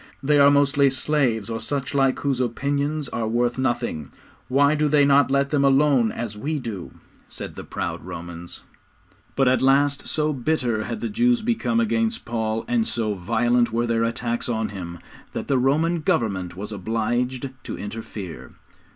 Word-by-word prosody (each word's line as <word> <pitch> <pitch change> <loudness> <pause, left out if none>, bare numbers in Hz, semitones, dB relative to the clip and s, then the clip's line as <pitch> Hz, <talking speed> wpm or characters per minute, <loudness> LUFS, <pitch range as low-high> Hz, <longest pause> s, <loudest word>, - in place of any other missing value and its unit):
'They 145 +1 +3
are 140 0 +8
mostly 140 0 +4
slaves 130 -5 0
or 115 -1 -3
such 135 +4 -3
like 135 -2 +2
whose 135 -3 0
opinions 140 +4 -1
are 115 -2 -2
worth 120 +2 0
nothing. 120 - -1 0.4
Why 140 +3 +4
do 150 0 +1
they 145 -1 +4
not 140 0 +4
let 140 0 +1
them 145 -2 +2
alone 135 -4 +4
as 115 -3 -5
we 150 +9 -2
do?' 110 - -6 0.4
said - - -8
the - - -8
proud - - -4
Romans. 85 0 -8 0.7
But 135 -1 +3
at 130 +1 +3
last 140 +2 +3
so 155 0 +1
bitter 125 -5 -1
had 225 - -5
the - - -1
Jews 240 +1 +2
become 235 0 0
against 225 0 0
Paul, 110 -1 -2
and 235 -2 +1
so 110 -3 -1
violent 120 +6 +1
were 120 +1 0
their 115 -1 +1
attacks 120 +1 -2
on 110 -2 -1
him, 85 -4 -7 0.4
that - - -4
the 135 -2 +2
Roman 160 +6 +2
Government 95 - -1
was 105 +2 -6
obliged 120 +5 -2
to - - -6
interfere. 105 -4 -7
130 Hz, 170 wpm, -23 LUFS, 115-145 Hz, 0.7 s, are